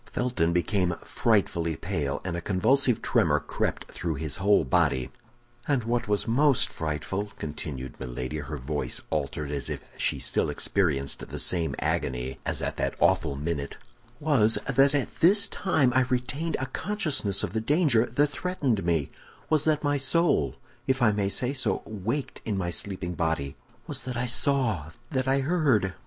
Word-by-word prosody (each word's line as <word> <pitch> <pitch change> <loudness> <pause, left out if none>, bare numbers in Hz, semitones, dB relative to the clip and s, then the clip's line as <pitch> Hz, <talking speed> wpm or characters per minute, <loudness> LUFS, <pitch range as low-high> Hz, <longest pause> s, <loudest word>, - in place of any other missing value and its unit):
Felton 120 -10 0
became 90 0 +1
frightfully 85 -7 +1
pale, 80 -5 -2
and 90 -2 -2
a 85 - -3
convulsive 115 - +2
tremor - - +3
crept - - -3
through 85 -2 -3
his 75 +1 -4
whole 100 +2 +4
body. 65 0 +1 0.6
"And 140 -5 +1
what 120 +1 -1
was 105 -1 +1
most 135 +3 +3
frightful," 80 +7 -3
continued 75 -5 -6
Milady, 65 +3 -4
her 75 +1 -5
voice 75 +3 -3
altered, 75 -1 -2
as 70 -4 -2
if - - -4 0.2
she - - 0
still - - +1
experienced 75 -8 0
the - - -5
same 85 -3 +1
agony 65 +1 -2
as - - -2
at - - -3
that - - -1
awful 85 -5 +2
minute, 70 -1 -3 0.4
"was 130 -8 +3
that 135 +2 +4
at 140 - -2
this 200 +5 +5
time 155 -9 +1
I 130 - +4
retained 135 +6 -1
a 130 - -1
consciousness 145 - -1
of - - -3
the 110 - 0
danger 140 -3 +3
that 145 +1 +2
threatened 145 - -1
me; 80 -5 0 0.4
was 155 -2 +3
that 155 -1 +2
my 145 0 +2
soul, 135 - +2 0.3
if 130 0 +2
I 110 - +6
may 100 -1 0
say 125 +7 +1
so, 130 - -1
waked 110 +7 -4
in 105 -3 -2
my 90 -2 -1
sleeping 90 -1 -2
body; 80 -4 -1 0.3
was - - -3
that 125 -2 -3
I 120 - 0
saw, 120 - +1 0.2
that 130 -1 0
I 135 +1 +3
heard. 135 - +2
105 Hz, 165 wpm, -27 LUFS, 80-135 Hz, 0.6 s, I